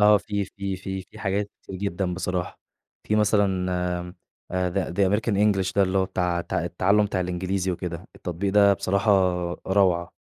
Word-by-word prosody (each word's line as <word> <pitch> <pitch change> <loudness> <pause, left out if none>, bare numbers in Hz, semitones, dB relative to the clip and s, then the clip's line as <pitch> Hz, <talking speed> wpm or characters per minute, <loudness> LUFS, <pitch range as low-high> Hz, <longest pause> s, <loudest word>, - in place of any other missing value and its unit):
آه، 105 0 +7
في 100 0 -2
في 100 0 -5
في 95 +1 -5
في - - -16
حاجات 100 0 -1
كتير 95 - -8
جدًا 95 -2 -2
بصراحة، 90 -1 -3 0.5
في 105 - +2
مثلًا 100 -3 +2
آآ 90 0 -2 0.6
The 95 -1 -2
the 95 0 +3
American 105 +2 +1
English 95 -2 +2
ده 100 - +5
اللي 95 0 +1
هو 95 - +3
بتاع 90 -2 -1
ت - - -10
التّعلُّم 100 +3 +2
بتاع 100 -2 -1
الإنجليزي 90 +1 -1
وكده، 90 +1 -5
التطبيق 95 +2 -3
ده 100 -1 +6
بصراحة 100 +2 +1 0.6
روعة، 95 -3 +2
95 Hz, 170 wpm, -25 LUFS, 90-100 Hz, 0.6 s, آه